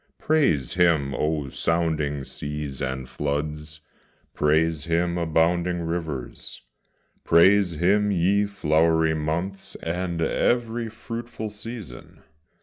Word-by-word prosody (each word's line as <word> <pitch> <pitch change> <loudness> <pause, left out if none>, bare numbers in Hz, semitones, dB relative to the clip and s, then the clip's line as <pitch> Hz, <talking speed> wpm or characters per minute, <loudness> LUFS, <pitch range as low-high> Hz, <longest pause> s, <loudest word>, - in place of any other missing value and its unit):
Praise 135 - +1
Him, 80 -6 +2
O 75 -1 -1
sounding 80 -3 -1
seas, 75 0 -6
and 65 -1 -3
floods! 75 +2 -4 0.5
praise 80 0 +1
Him, 85 +1 +1
abounding 85 +1 +1
rivers; 80 -7 -5 0.6
Praise 95 +2 +5
Him, 100 +6 +2
ye 100 +2 +2
flowery 80 -3 +2
months, 85 +5 -3
and 85 0 -3
every 115 +6 0
fruitful 115 -1 -6
season! 105 - -9
80 Hz, 95 wpm, -24 LUFS, 75-95 Hz, 0.6 s, Praise